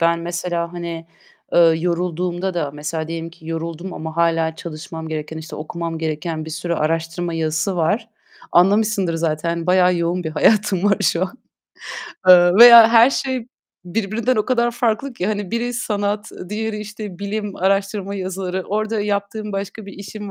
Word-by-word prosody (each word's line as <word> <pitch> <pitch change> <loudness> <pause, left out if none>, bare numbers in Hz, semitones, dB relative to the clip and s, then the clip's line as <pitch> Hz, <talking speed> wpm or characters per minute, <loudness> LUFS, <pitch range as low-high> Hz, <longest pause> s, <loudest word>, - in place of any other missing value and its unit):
Ben 170 0 +3
mesela, 170 0 -3
hani, 170 -1 -6 0.5
eee, - - +4
yorulduğumda 175 +2 +1
da 155 -5 -1
mesela 150 +2 -4
diyelim 165 0 -5
ki 165 -1 -17
yoruldum 165 +2 -5
ama 160 0 -7
hâlâ 165 -1 +1
çalışmam 160 0 -7
gereken, 155 0 -5
işte, 160 0 -8
okumam 165 +1 -5
gereken 160 0 -3
bir 160 - -8
sürü 170 +2 -3
araştırma 165 +2 -2
yazısı 160 +4 -1
var. 210 +8 0 0.4
Anlamışsındır 195 0 +3
zaten 165 +1 -2
bayağı 180 0 +4
yoğun 170 +1 -1
bir 160 - -2
hayatım 200 +3 +2
var 205 -1 +4
şu 170 - +2
an. 190 +7 -4 0.9
Eee, 175 -1 +8
veya 235 +1 +10
her 230 +2 +6
şey 260 -3 -2 0.4
birbirinden 225 +6 -1
o 215 - +1
kadar 240 -2 +1
farklı 240 +3 -1
ki. 185 -6 -3
Hani 205 -3 -2
biri 240 +1 -1
sanat, 210 -2 -2 0.2
diğeri, 215 +1 -3
işte, 210 -3 -8
bilim, 205 0 -4
araştırma 195 +1 0
yazıları. 190 -1 -3
Orada 215 +1 -1
yaptığım 205 +1 -3
başka 200 +2 -5
bir 200 - -9
işim 205 +1 -8
180 Hz, 155 wpm, -20 LUFS, 165-210 Hz, 0.9 s, veya